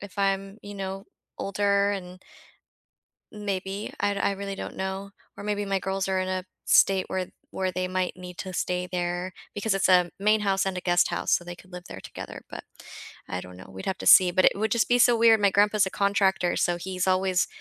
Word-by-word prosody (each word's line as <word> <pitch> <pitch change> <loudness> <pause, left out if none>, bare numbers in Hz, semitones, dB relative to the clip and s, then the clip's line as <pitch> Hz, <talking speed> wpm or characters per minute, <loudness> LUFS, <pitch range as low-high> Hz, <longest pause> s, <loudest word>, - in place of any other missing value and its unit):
if 200 0 -11
I'm, 195 +1 -1
you 205 0 -9
know, 195 0 -5 0.3
older 200 0 +1
and 180 -2 -7 1.1
Maybe, 200 -1 -4
I 205 0 +1
I 200 0 +1
really 195 0 -5
don't - - -7
know. 190 +1 -4 0.2
Or - - -9
maybe 205 0 -1
my 195 -1 0
girls 195 0 -2
are 190 -1 0
in 185 0 -2
a 185 -1 -2 0.2
state 190 -1 +4
where 185 -1 -2 0.2
where 185 -1 -2
they 185 +1 -2
might 185 0 -2
need 180 -1 -10
to 185 -1 -5
stay 180 +1 -1
there 175 0 -2 0.2
because 205 0 0
it's 195 - +1
a 180 -2 +5
main 210 +1 +3
house 195 -1 +1
and 190 -1 -2
a - - -3
guest 175 -1 +3
house - - -2
so - - +3
they 175 0 -8
could 185 +1 -18
live 180 0 -8
there 95 - -8
together, - - -9
but - - -7 0.6
I 90 - -3
don't 90 0 -11
know, 95 - -12
we'd 95 0 -9
have 190 - -2
to - - -6
see, 180 -1 +8
but 185 +1 +2
it - - +6
would 220 +2 -1
just 235 -1 +2
be 245 - +4
so 240 -1 +5
weird, 225 -1 +6
my 200 -1 +4
grandpa's 205 0 +3
a - - -2
contractor, 195 -2 +1
so 175 0 +1
he's 185 +1 -3
always 185 -1 +2
190 Hz, 220 wpm, -26 LUFS, 185-200 Hz, 1.1 s, see